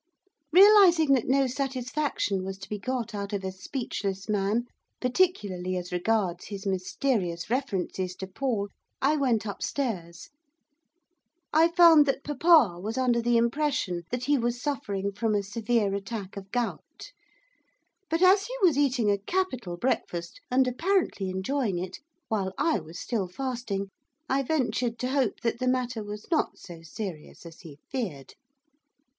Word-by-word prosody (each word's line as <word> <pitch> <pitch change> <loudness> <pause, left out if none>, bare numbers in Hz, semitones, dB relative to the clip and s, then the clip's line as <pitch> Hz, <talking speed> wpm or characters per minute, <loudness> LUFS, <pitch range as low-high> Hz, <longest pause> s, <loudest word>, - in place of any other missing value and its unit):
Realising 360 -5 +7
that 255 -4 +1
no 270 +1 +3
satisfaction 260 -5 -2
was 190 0 -5
to 195 - -10
be 210 - -3
got 240 +1 -3
out 200 0 -4
of 200 -1 -2
a 190 - -3
speechless 195 -2 -4
man 210 +3 0 0.3
particularly 205 - 0
as 180 0 -6
regards 180 -1 0
his 200 -1 -7
mysterious 190 -1 -1
references 190 -8 -2
to 190 - -6
Paul 205 0 -2 0.3
I 290 +3 +3
went 250 -7 +1
upstairs. 195 -5 -4 1.2
I 320 +2 +6
found 335 -4 +7
that 275 0 0
papa 295 - +4
was 215 +6 -4
under 245 -2 +2
the 240 0 +3
impression 235 - 0
that 250 0 -3
he 285 +1 +2
was 240 +1 -1
suffering 200 -8 -2
from 215 +2 0
a 205 - +1
severe 210 0 0
attack 200 0 -5
of 195 -1 -8
gout. 245 - -4 1.0
But 330 +3 +1
as 390 +2 +6
he - - -5
was 320 -6 +5
eating 250 -7 +2
a 200 - +1
capital 245 - -2
breakfast, 175 -6 -2
and 260 0 +3
apparently 325 - 0
enjoying 195 +2 -1
it, 180 +1 -5 0.3
while 195 -4 -1
I 300 -4 +2
was 160 +1 -10
still 215 -6 -2
fasting 225 -2 -4 0.4
I 270 +1 +1
ventured 250 -4 0
to 250 - -2
hope 265 -6 0
that 235 0 -1
the 255 - -1
matter 250 -3 0
was 210 +1 -7
not 320 - +1
so 170 -3 -11
serious 165 -1 -8
as 165 -1 -11
he 155 -5 -12
feared. 190 - -4
230 Hz, 150 wpm, -27 LUFS, 195-270 Hz, 1.2 s, Realising